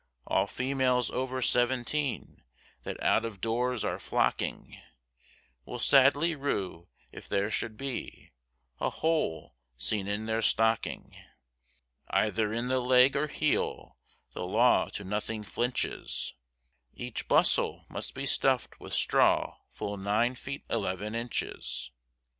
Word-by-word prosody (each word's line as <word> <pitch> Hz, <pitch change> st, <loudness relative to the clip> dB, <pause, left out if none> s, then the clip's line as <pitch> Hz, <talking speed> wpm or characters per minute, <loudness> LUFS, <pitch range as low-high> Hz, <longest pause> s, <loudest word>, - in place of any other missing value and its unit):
All -, -, +2 dB
females 130 Hz, -1 st, +1 dB
over 130 Hz, 0 st, -2 dB
seventeen, 130 Hz, +4 st, 0 dB, 0.4 s
that -, -, -6 dB
out 110 Hz, -, +3 dB
of 110 Hz, -4 st, -5 dB
doors 120 Hz, +2 st, 0 dB
are -, -, -2 dB
flocking, -, -, -1 dB, 0.8 s
Will 125 Hz, -, -6 dB
sadly 140 Hz, +6 st, +5 dB
rue 100 Hz, -, -3 dB, 0.2 s
if -, -, -11 dB
there 100 Hz, +2 st, 0 dB
should 110 Hz, 0 st, -2 dB
be, 135 Hz, -2 st, -5 dB, 0.5 s
a -, -, +1 dB
hole 160 Hz, -, -1 dB, 0.2 s
seen 95 Hz, -, -1 dB
in 105 Hz, +2 st, -2 dB
their 110 Hz, 0 st, 0 dB
stocking, 110 Hz, 0 st, +1 dB, 0.9 s
Either 110 Hz, 0 st, +1 dB
in 115 Hz, +2 st, -1 dB
the 130 Hz, 0 st, +2 dB
leg 125 Hz, +1 st, +5 dB
or 150 Hz, +2 st, +1 dB
heel, 150 Hz, 0 st, -1 dB, 0.3 s
the -, -, -6 dB
law 110 Hz, +7 st, +3 dB
to 100 Hz, -, -6 dB
nothing 105 Hz, +2 st, -3 dB
flinches, 120 Hz, +4 st, -2 dB, 0.6 s
Each 120 Hz, -2 st, -5 dB
bustle -, -, +3 dB
must -, -, -5 dB
be 135 Hz, +1 st, -3 dB
stuffed 130 Hz, -1 st, +1 dB
with -, -, -5 dB
straw -, -, +3 dB
full 100 Hz, 0 st, -5 dB
nine 105 Hz, +5 st, +1 dB
feet 140 Hz, +3 st, -7 dB
eleven 105 Hz, -1 st, -2 dB
inches. 115 Hz, -, -4 dB
120 Hz, 125 wpm, -30 LUFS, 105-130 Hz, 0.9 s, sadly